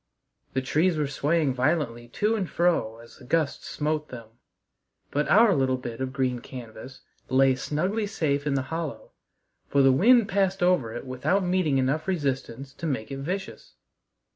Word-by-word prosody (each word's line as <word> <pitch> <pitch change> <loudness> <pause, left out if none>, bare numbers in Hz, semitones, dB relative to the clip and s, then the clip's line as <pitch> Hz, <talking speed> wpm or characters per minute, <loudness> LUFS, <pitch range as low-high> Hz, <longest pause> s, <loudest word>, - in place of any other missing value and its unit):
The 130 0 -1
trees 160 +6 +1
were 150 - +1
swaying 145 +1 0
violently 125 -3 -1
to 210 - 0
and 195 -5 -2
fro 165 -11 +1
as 115 0 -15
the - - -16
gusts 155 +2 -1
smote 150 0 -2
them, 115 -3 -9 0.8
but 150 +1 0
our 220 -1 +6
little 130 -3 +1
bit 120 -2 -7
of 130 0 -2
green 130 -2 -1
canvas 125 +1 -10 0.3
lay 135 0 +4
snugly 185 - -1
safe 145 -7 -1
in 140 - +1
the 135 - 0
hollow, 165 -2 -5 0.6
for 140 -1 +3
the 135 - +6
wind 225 - +5
passed 195 -3 0
over 175 -11 +2
it 120 - -6
without 130 +10 0
meeting 180 -6 +1
enough 135 +6 0
resistance 140 -6 -3
to 165 - -5
make 130 -5 -3
it 135 - -5
vicious. 190 +7 -5
140 Hz, 165 wpm, -26 LUFS, 130-175 Hz, 0.8 s, our